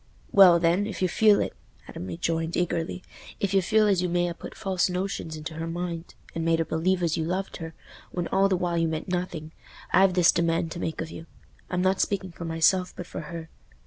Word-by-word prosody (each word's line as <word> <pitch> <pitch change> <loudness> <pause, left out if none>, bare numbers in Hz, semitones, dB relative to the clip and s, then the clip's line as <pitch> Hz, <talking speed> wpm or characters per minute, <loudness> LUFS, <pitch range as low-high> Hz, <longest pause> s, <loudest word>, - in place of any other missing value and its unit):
"Well, 185 -4 +8
then, 175 +4 +2
if 205 -3 -4
you - - +4
feel 210 +3 +4
it," - - -2 0.3
Adam 90 - -7
rejoined, 165 - -2
eagerly; 175 0 -1 0.4
"if 200 -1 -1
you 195 - +4
feel 215 +4 +3
as 195 -4 +3
you 180 - 0
may 175 0 +1
ha' 170 - -3
put - - -9
false 190 -1 0
notions 180 -3 -3
into 155 +1 -6
her 165 +1 -4
mind, 170 0 -5 0.2
and 165 - -3
made 165 0 +3
her 165 - 0
believe 180 +4 0
as 165 -2 +1
you 160 - 0
loved 185 +4 -3
her, 165 -2 -8 0.3
when 175 -1 -3
all 195 +1 +3
the 185 - +2
while 175 -1 0
you 165 - +2
meant 160 +3 -4
nothing, 175 -4 -3 0.4
I've 190 -1 +5
this 180 -2 +6
demand 165 0 0
to 170 - -5
make 160 - -3
of 160 - -5
you—I'm 180 +2 -7
not 190 0 +2
speaking 190 -2 -1
for 170 0 -8
myself, 165 +3 +2
but 180 - -5
for - - -6
her. 165 -2 -7
175 Hz, 220 wpm, -26 LUFS, 165-185 Hz, 0.4 s, Well